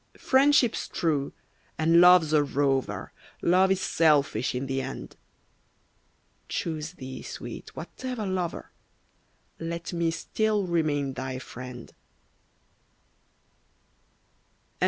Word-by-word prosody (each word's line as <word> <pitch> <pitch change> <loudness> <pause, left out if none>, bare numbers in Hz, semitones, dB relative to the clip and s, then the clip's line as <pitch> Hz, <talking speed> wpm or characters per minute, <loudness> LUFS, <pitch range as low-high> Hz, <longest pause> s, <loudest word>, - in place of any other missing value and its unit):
Friendship's 265 -3 +3
true, 150 -5 -1 0.5
and 165 +2 +5
Love's 180 -3 +7
a 150 -1 +5
rover, 135 -1 -1 0.3
Love 185 +2 +4
is 190 0 +1
selfish 145 -9 +2
in 130 +2 -2
the 135 0 -1
end. - - -7 1.3
Choose 160 0 -3
thee, 130 -6 -8
Sweet, - - -8
whatever 250 -4 -5
lover, 185 -3 -3 0.9
Let 170 +1 -5
me 170 -1 +1
still 210 +5 0
remain 150 -5 0
thy 130 0 -4
friend. 125 -1 -9
160 Hz, 95 wpm, -27 LUFS, 135-180 Hz, 1.3 s, Love's